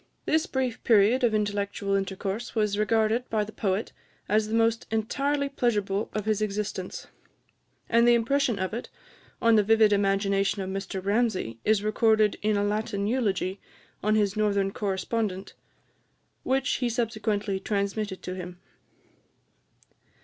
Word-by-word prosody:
This 315 +3 +1
brief 255 -3 -2
period 225 +3 +4
of 225 -3 +3
intellectual 200 -1 -1
intercourse 195 +4 -3
was 210 -2 +1
regarded 220 +3 +1
by 215 -1 +1
the 210 - -8
poet 200 -1 -2 0.3
as 215 +1 +2
the 220 - -2
most 230 0 +1
entirely 280 +6 0
pleasurable 210 -6 -1
of 215 -1 -3
his 215 -1 0
existence; 210 0 -3 0.8
and 235 +1 +4
the 240 - +6
impression 250 0 +1
of 185 +1 -3
it 235 - -5 0.5
on 230 -1 +5
the 210 - +5
vivid 220 0 +4
imagination 195 0 +1
of 190 - -5
Mr 190 -1 -5
Ramsay 200 - 0
is 215 -1 +2
recorded 215 0 +3
in 215 0 +1
a 200 - +1
Latin 205 -1 -1
eulogy 205 -5 -1 0.4
on 215 +1 +2
his 205 -2 +1
northern 200 -2 +1
correspondent, 195 0 -2 0.9
which 265 +1 0
he 245 -2 0
subsequently 215 -4 -1
transmitted 200 0 -2
to 180 - -4
him. 180 -1 -7
215 Hz, 140 wpm, -27 LUFS, 200-225 Hz, 0.9 s, the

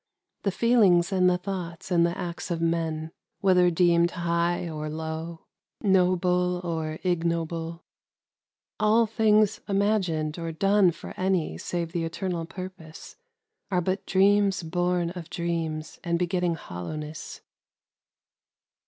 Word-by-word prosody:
The 200 - 0
feelings 195 -6 +4
and 185 -1 +4
the 180 - +2
thoughts 180 -1 -6
and 170 -1 +4
the 170 +1 0
acts 175 +1 -5
of 170 -2 -1
men, 165 -1 -1
— - - -57
whether 180 -2 +5
deemed 170 0 +3
high 170 0 0
or 155 -1 -4
low, 160 +1 -5 0.4
noble 180 -2 +2
or 160 -2 -3
ignoble, 165 -1 -1 0.5
— - - -67
all 220 +2 +4
things 215 -1 +3
imagined 185 -6 0
or 165 -1 -3
done 195 +3 +4
for 170 - -7
any 185 - 0
save 170 - -3
the 170 -1 -2
eternal 170 0 -3
purpose, 185 -3 -9 0.5
are 180 - +1
but 185 +2 -2
dreams 195 0 +3
born 175 +1 0
of 175 -2 -8
dreams 165 -3 -3
and 170 -1 0
begetting 180 -1 0
hoUowness. 150 - -7
175 Hz, 125 wpm, -26 LUFS, 165-185 Hz, 0.5 s, whether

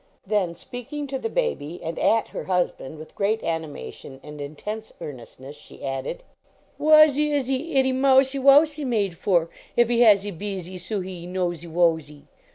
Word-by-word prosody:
Then, 190 -4 0
speaking 250 - -7
to 270 -1 -4
the 455 - -3
baby 310 - -2
and 165 0 -4
at 225 0 +2
her - - -6
husband 180 -5 -2
with 155 +1 -11
great 215 +2 0
animation 145 - -5
and 150 0 -9
intense 210 +10 -6
earnestness, 130 +1 -9
she - - -12
added: 135 - -4 0.3
" - - -36
Whassie 300 -1 +5
is 285 -3 +1
he 270 +5 -3
ittie 265 -1 +4
mousie 265 +1 +4
wousie 290 +3 +5
made 210 -9 0
for 170 -1 +1 0.3
if 240 -1 +4
he 240 -1 +2
hassie 205 -3 +5
beezie 185 -1 -6
soo 190 +3 -3
he 180 -2 -7
nosie 175 -2 -3
wosie? 160 -3 0
200 Hz, 165 wpm, -24 LUFS, 165-265 Hz, 0.3 s, Whassie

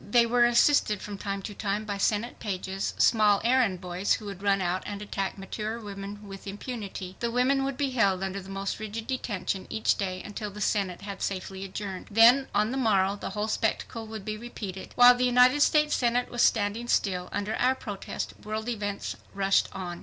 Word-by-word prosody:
They 235 +2 +5
were 240 +1 +4
assisted 240 -3 +4
from 205 -1 -7
time 200 0 -4
to 205 - -6
time 205 +1 -2
by 205 -1 -4
Senate 215 +4 0
pages, 190 -2 -3
small 210 -3 +4
errand 235 -6 +3
boys 180 +2 0
who 215 - -3
would 195 -2 -7
run 200 -1 +2
out 185 0 -1
and 205 -1 -5
attack 200 -2 -3
mature 215 +4 -4
women 205 -1 -8
with 195 0 -9
impunity. 200 -3 -6
The 235 - -1
women 255 +3 +2
would 270 -1 -2
be 280 -2 0
held 195 -6 +2
under 195 +1 -3
the 190 - -12
most 195 +1 -3
rigid 215 +1 -5
detention 205 -7 -3
each 220 - +2
day 185 -2 -3
until 210 +1 -5
the 205 +1 -10
Senate 195 -3 0
had 200 -1 -7
safely 190 0 -3
adjourned. 195 -1 -6
Then 235 +5 +6
on 210 +2 +1
the 265 - -2
morrow 200 -6 +2
the - - -6
whole 210 +1 0
spectacle 225 +1 -2
would 215 -3 -7
be 215 0 -3
repeated. 205 -5 -7
While 245 0 +9
the 250 +1 0
United 250 +3 +5
States 300 0 +4
Senate 245 0 +1
was 240 - -1
standing 220 +2 +2
still 180 -6 0
under 205 +2 -2
our 255 +2 +3
protest 205 -6 -5
world 215 +2 -3
events 205 -3 -3 0.2
rushed 195 0 +2
on. 175 -2 -6
210 Hz, 200 wpm, -28 LUFS, 195-235 Hz, 0.2 s, While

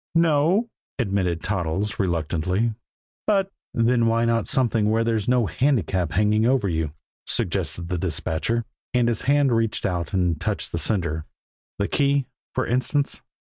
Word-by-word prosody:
"No 165 -3 +4
o," 195 +10 +2 0.3
admitted 95 - 0
Toddles 95 +2 -2
reluctantly; 90 +4 0 0.5
"but 195 -2 +2
" - - -76
"Then 115 0 +3
why 115 +1 +2
not 115 -1 +1
something 115 -6 +2
where 110 +1 +2
there's 115 -3 0
no 125 -2 +3
handicap 95 - 0
hanging 105 +2 +3
over 125 -5 +2
you?" 80 -4 -1 0.3
suggested 85 -1 -1
the 90 -1 -2
dispatcher 95 +7 -1 0.3
and 120 -1 +3
his 120 - 0
hand 145 -2 +4
reached 115 -2 0
out 85 -3 -1
and 90 -5 0
touched - - -2
the 85 - -2
sender. 80 -4 -1 0.5
"The 100 - 0
key, 140 -1 +2 0.3
for - - +1
instance?" 130 +4 0
110 Hz, 150 wpm, -24 LUFS, 90-125 Hz, 0.5 s, No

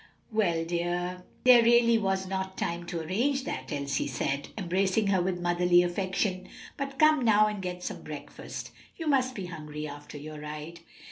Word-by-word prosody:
"Well, 175 -7 +1
dear, 175 +1 -2 0.2
there 250 -1 +8
really 235 0 +5
was 190 -2 0
not 190 0 -3
time 170 0 -2
to 170 -1 -3
arrange 245 - 0
that," 130 - -5
Elsie 140 -1 -1
said, 140 +1 -2
embracing 190 +2 +1
her 190 -2 +3
with 180 0 -1
motherly 175 0 +4
affection. 185 +1 -1 0.3
"But 275 -1 -4
come 310 -2 +5
now 215 -2 +5
and 210 -2 -2
get 180 -1 -5
some - - -5
breakfast. - - -8 0.3
You 325 - -5
must 260 -3 +2
be 195 - -4
hungry 150 -3 -6
after 145 +1 -9
your 150 +1 -8
ride." 150 +2 -7
180 Hz, 165 wpm, -29 LUFS, 170-215 Hz, 0.3 s, there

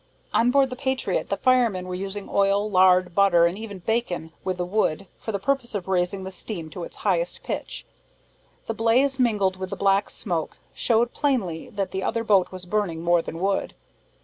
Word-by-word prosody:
On 235 - +4
board 270 0 +3
the - - -3
Patriot, 265 0 -1
the - - 0
firemen 235 -8 +2
were 180 - -4
using 195 +2 -5
oil, 200 +1 +2
lard, 185 -2 +4
butter, 175 -3 +5
and 170 +1 +1
even 210 -1 -7
bacon, 180 -5 -2
with 185 -1 -2
the 180 - -1
wood, 195 -2 0
for 220 - -4
the 200 - -1
purpose 245 +1 -1
of 190 -3 -3
raising 190 +1 0
the 190 - -6
steam 175 -4 -6
to 175 - -6
its - - -9
highest 175 -3 0
pitch. - - -5 0.8
The 225 - -2
blaze, 250 +5 +2
mingled 205 -6 +2
with 185 0 -5
the - - -4
black 195 0 +2
smoke, 170 -6 -3 0.2
showed 235 0 +1
plainly 215 - -1
that 200 -5 -3
the 190 +1 -3
other 230 +4 -1
boat 200 -5 +3
was 185 -1 -8
burning 180 -4 -1
more 175 0 +3
than 165 - -7
wood. 195 +2 -1
195 Hz, 195 wpm, -24 LUFS, 180-225 Hz, 0.8 s, butter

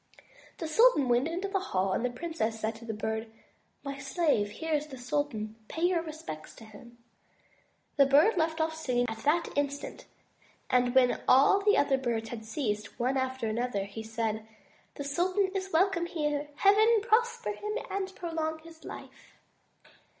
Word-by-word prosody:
'* - - -24
The 325 - -4
sultan 315 - +4
went 245 +4 +3
into 355 +4 -3
the 390 0 0
hall, 190 - -1
and - - -1
the 250 - +1
princess 245 -5 -3
said 220 +1 -1
to 230 - -12
the 230 - -3
Bird, 220 +1 -3 0.5
"My 275 -1 -5
slave, 270 - +1
here 320 +10 -4
is 300 0 0
the 270 -3 -9
sultan; 245 -5 -2
pay 325 - -5
your 350 -1 +3
respects 305 - -8
to 225 - -13
him." 225 +3 -14 1.0
The 275 -1 +6
Bird 295 +11 +5
left 320 -1 0
off 320 0 +1
singing 250 -6 0 0.2
that 325 +4 +2
instant 285 0 -3 0.6
and 250 0 +3
when 255 -1 +4
all 280 +10 +6
the 415 0 +4
other 270 -2 +3
birds 230 -3 -2
had 225 -2 -7
ceased 220 -2 -3
one 255 +3 +1
after 260 -2 -1
another, 220 -2 -1
he 200 +2 -7
said: 220 -1 -3 0.5
*'The 285 - -5
sultan 365 +7 +1
is 385 -1 -3
welcome 345 0 +2
here. 295 -3 -2
Heaven 430 +5 +5
prosper 475 +1 +1
him, 420 +1 -4
and 380 -1 -3
prolong 320 -2 -3
his 330 -1 -14
life.'' - - -11
285 Hz, 170 wpm, -29 LUFS, 235-340 Hz, 1.0 s, The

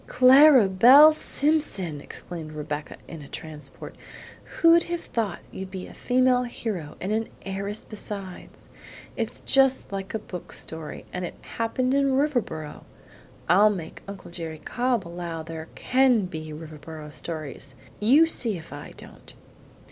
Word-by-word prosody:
"Clara 260 -1 +7
Belle 255 +11 +8
Simpson!" 280 - -1
exclaimed 160 0 -7
Rebecca 150 0 -5
in 165 -2 -9
a 140 - -11
transport. 155 0 -9 0.5
"Who'd 335 0 +4
have 345 -1 -2
thought 215 -6 -3
you'd 190 0 -7
be 185 -1 -7
a - - -12
female 255 0 +2
hero 215 -10 -5
and 190 - -3
an 220 +1 0 0.2
heiress 200 +2 -4
besides? 200 -3 -6 0.5
It's 230 0 -3
just 270 -4 +3
like 195 +1 -5
a - - +2
book 180 -4 -9
story, 160 -1 -6
and 180 - -3
it 175 - -5
happened 255 +3 -1
in 275 -1 +2
Riverboro. 245 - -2 0.6
I'll 200 +5 +6
make 180 -6 -6
Uncle 200 -3 -9
Jerry 165 -2 -5
Cobb 240 +3 -1
allow 170 -1 -5
there 160 0 -7
CAN 250 -5 +3
be 155 -3 -7
Riverboro 155 0 -9
stories, 145 -5 -6 0.2
you 270 +10 +6
see 230 - 0
if 160 -3 -11
I 145 0 -9
don't." - - -13
195 Hz, 140 wpm, -25 LUFS, 160-250 Hz, 0.6 s, Belle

